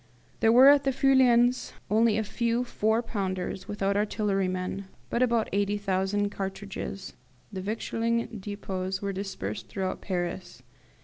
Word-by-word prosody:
There 225 Hz, 0 st, +4 dB
were 255 Hz, +3 st, +8 dB
at 285 Hz, 0 st, +7 dB
the 270 Hz, -, +2 dB
Feuillans 255 Hz, -2 st, +3 dB, 0.2 s
only 220 Hz, 0 st, +4 dB
a 220 Hz, -, +1 dB
few 235 Hz, +3 st, 0 dB
four 225 Hz, -1 st, 0 dB
pounders 190 Hz, -4 st, -3 dB
without 200 Hz, -1 st, -1 dB
artillerymen, 195 Hz, -2 st, -1 dB, 0.3 s
and 250 Hz, +1 st, +2 dB
but 230 Hz, -2 st, +1 dB
80,000 200 Hz, 0 st, 0 dB
cartridges. 195 Hz, 0 st, -5 dB, 0.4 s
The 190 Hz, -, -4 dB
victualling 230 Hz, +2 st, -2 dB
depots 190 Hz, -2 st, -4 dB
were 200 Hz, 0 st, -2 dB
dispersed 115 Hz, -, -5 dB
throughout 190 Hz, -, -3 dB
Paris. 175 Hz, -5 st, -4 dB
205 Hz, 125 wpm, -28 LUFS, 190-230 Hz, 0.4 s, were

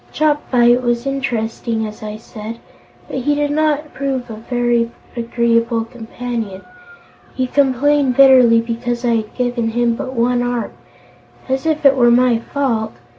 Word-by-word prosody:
Chopfyt 255 Hz, -5 st, +2 dB
was 240 Hz, 0 st, -1 dB
interesting, 230 Hz, -4 st, -2 dB
as 215 Hz, 0 st, -9 dB
I 215 Hz, 0 st, -6 dB
said, 220 Hz, 0 st, -9 dB, 0.5 s
but -, -, -4 dB
he 290 Hz, +3 st, 0 dB
did 290 Hz, 0 st, 0 dB
not 300 Hz, 0 st, 0 dB
prove 260 Hz, -3 st, -3 dB
a -, -, -6 dB
very 240 Hz, 0 st, 0 dB, 0.3 s
agreeable 235 Hz, -1 st, 0 dB
companion. 230 Hz, -4 st, -6 dB, 0.7 s
He 260 Hz, -, 0 dB
complained 275 Hz, 0 st, +2 dB
bitterly 255 Hz, -4 st, +7 dB
because 240 Hz, +1 st, -3 dB
I 235 Hz, -1 st, +2 dB
had 215 Hz, -1 st, -6 dB
given 245 Hz, -2 st, -1 dB
him 235 Hz, +1 st, +1 dB
but 260 Hz, 0 st, -5 dB
one 245 Hz, +1 st, +1 dB
arm 245 Hz, -3 st, -2 dB, 0.8 s
as 265 Hz, +3 st, -1 dB
if 310 Hz, -2 st, -1 dB
it 275 Hz, -1 st, +7 dB
were 240 Hz, -2 st, +4 dB
my 240 Hz, -1 st, +4 dB
fault! 235 Hz, -, -2 dB
245 Hz, 145 wpm, -18 LUFS, 230-265 Hz, 0.8 s, bitterly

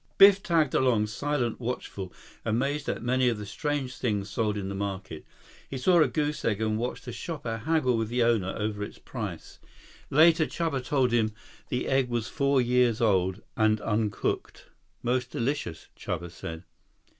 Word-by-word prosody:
Biff 195 Hz, 0 st, +8 dB
tagged 160 Hz, -7 st, +2 dB
along, 120 Hz, -5 st, +3 dB
silent, 120 Hz, +2 st, -1 dB
watchful, 115 Hz, -6 st, -4 dB, 0.3 s
amazed 135 Hz, +6 st, 0 dB
at -, -, -3 dB
many 125 Hz, +1 st, +3 dB
of 115 Hz, -, -1 dB
the 105 Hz, -, -6 dB
strange 140 Hz, +2 st, -3 dB
things 105 Hz, -4 st, -1 dB
sold 105 Hz, -1 st, 0 dB
in 100 Hz, -2 st, -3 dB
the 100 Hz, -, -3 dB
market. 95 Hz, -5 st, -4 dB, 0.5 s
He 135 Hz, -, -4 dB
saw 170 Hz, +6 st, +4 dB
a 150 Hz, -, +5 dB
goose 150 Hz, +3 st, -1 dB
egg 105 Hz, -3 st, +1 dB
and 110 Hz, -1 st, 0 dB
watched 125 Hz, +3 st, -3 dB
a 125 Hz, -, -5 dB
shopper 120 Hz, -5 st, -4 dB
haggle 130 Hz, 0 st, +1 dB
with 115 Hz, -1 st, 0 dB
the 120 Hz, 0 st, +2 dB
owner 110 Hz, -5 st, +2 dB
over 105 Hz, -1 st, -2 dB
its -, -, -7 dB
price. -, -, -7 dB, 0.5 s
Later, 160 Hz, +2 st, +5 dB
Chuba 160 Hz, -6 st, -2 dB
told 130 Hz, -1 st, +2 dB
him 110 Hz, -2 st, +1 dB, 0.3 s
the 125 Hz, -, -1 dB
egg 135 Hz, -2 st, +2 dB
was 120 Hz, -2 st, -1 dB
four 140 Hz, -2 st, +2 dB
years 125 Hz, -2 st, +3 dB
old 95 Hz, -4 st, +2 dB
and 110 Hz, -1 st, +3 dB
uncooked. 105 Hz, -1 st, -2 dB, 0.4 s
"Most 125 Hz, 0 st, 0 dB
delicious," 120 Hz, -, -3 dB
Chuba 85 Hz, +1 st, -4 dB
said. 80 Hz, 0 st, -7 dB
120 Hz, 165 wpm, -28 LUFS, 105-135 Hz, 0.5 s, Biff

